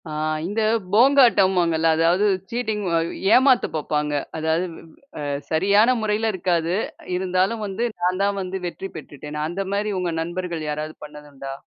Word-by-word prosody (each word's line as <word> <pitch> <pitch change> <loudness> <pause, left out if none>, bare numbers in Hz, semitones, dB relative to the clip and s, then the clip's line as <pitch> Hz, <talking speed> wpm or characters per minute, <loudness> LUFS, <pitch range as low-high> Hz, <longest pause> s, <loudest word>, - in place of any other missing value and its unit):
ஆ - - -6 0.3
இந்த 205 +5 -1 0.3
போங்காட்டம்வாங்கல்ல. 195 - +4
அதாவது 175 +5 +3 0.2
சீட்டிங் 220 -3 -2 0.2
அ - - +3 0.3
ஏமாத்தப் 260 -1 +4
பார்ப்பாங்க. 150 -1 -1 0.2
அதாவது 160 +3 0 0.5
அ - - -4 0.3
சரியான 200 +9 +4
முறையில 215 +1 0
இருக்காது. 175 -2 0 0.3
அ - - -16
இருந்தாலும் 190 +4 0
வந்து 195 +5 -2 0.2
நான் 185 +2 +1
தான் 200 0 0
வந்து 190 +1 -4
வெற்றி 195 +2 -6
பெற்றுட்டேன். 150 0 -8
அந்தமாரி 195 +4 -2
உங்க 175 -2 -2
நண்பர்கள் 170 -2 -4
யாராவது 150 +1 -4
பண்ணது 150 0 -12
உண்டா? 135 0 -7
185 Hz, 140 wpm, -22 LUFS, 160-210 Hz, 0.5 s, போங்காட்டம்வாங்கல்ல